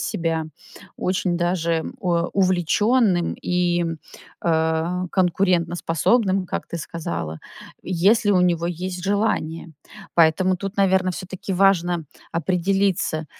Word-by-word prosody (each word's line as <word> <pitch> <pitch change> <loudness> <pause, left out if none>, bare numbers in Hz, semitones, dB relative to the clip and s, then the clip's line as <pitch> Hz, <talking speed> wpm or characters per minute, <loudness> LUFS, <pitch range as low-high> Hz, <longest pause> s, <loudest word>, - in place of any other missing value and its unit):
себя 165 -2 -2 0.5
очень 180 -1 -1
даже 170 -2 0 0.2
о 170 -1 0
увлечённым 185 +1 +2
и, 175 -1 +1 0.6
а, 160 +2 0
конкурентоспособным, 185 +2 +1
как - - -4
ты 170 - -5
сказала, 85 - -5 0.4
если 200 +4 +2
у 180 - +4
него 170 -1 +1
есть 180 +1 -4
желание. 190 -6 -1 0.4
Поэтому 175 +3 +3
тут, 195 +2 -6
наверно, 190 -2 +2
всё-таки 185 +1 -6
важно 180 -3 +2 0.3
определиться. 180 -1 0
180 Hz, 100 wpm, -22 LUFS, 165-190 Hz, 0.6 s, у